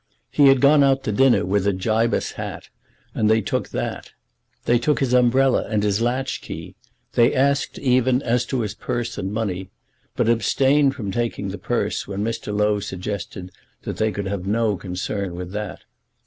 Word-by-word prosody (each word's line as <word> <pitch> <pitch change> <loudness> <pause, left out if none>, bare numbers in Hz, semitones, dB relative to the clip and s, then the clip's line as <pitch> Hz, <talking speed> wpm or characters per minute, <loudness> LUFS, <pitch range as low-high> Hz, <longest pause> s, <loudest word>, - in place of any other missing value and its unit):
He 145 -2 +5
had 135 -1 +5
gone 145 +1 +6
out 135 -1 +2
to - - -1
dinner 130 +4 +4
with 100 +1 +1
a 100 - +3
Gibus 110 +5 0
hat, - - -7 0.4
and 110 - +1
they 110 0 +4
took 100 - -2
that. - - -5 0.5
They 120 0 +3
took 150 +5 +1
his 130 -3 0
umbrella 125 +1 +3
and 105 -2 0
his 105 +1 +1
latch 130 +3 -1
key. - - -8 0.4
They 120 +3 +4
asked, 140 +1 +1
even, 130 0 +2
as 120 0 +1
to 130 -3 -1
his 105 -3 -3
purse 120 -1 -4
and 95 - -3
money; 95 -4 -3 0.5
but 120 - +1
abstained 135 +5 +3
from 105 -8 -4
taking 115 -2 -2
the 95 0 -6
purse 110 0 -2
when 100 0 -3
Mr. 115 -1 -3
Low 105 0 +1
suggested 95 -1 -6 0.3
that - - -5
they 110 0 +1
could 100 -1 -4
have 95 -1 -4
no 110 0 +1
concern 95 0 -4
with 90 0 -6
that. 105 +1 -5
110 Hz, 180 wpm, -22 LUFS, 100-125 Hz, 0.5 s, gone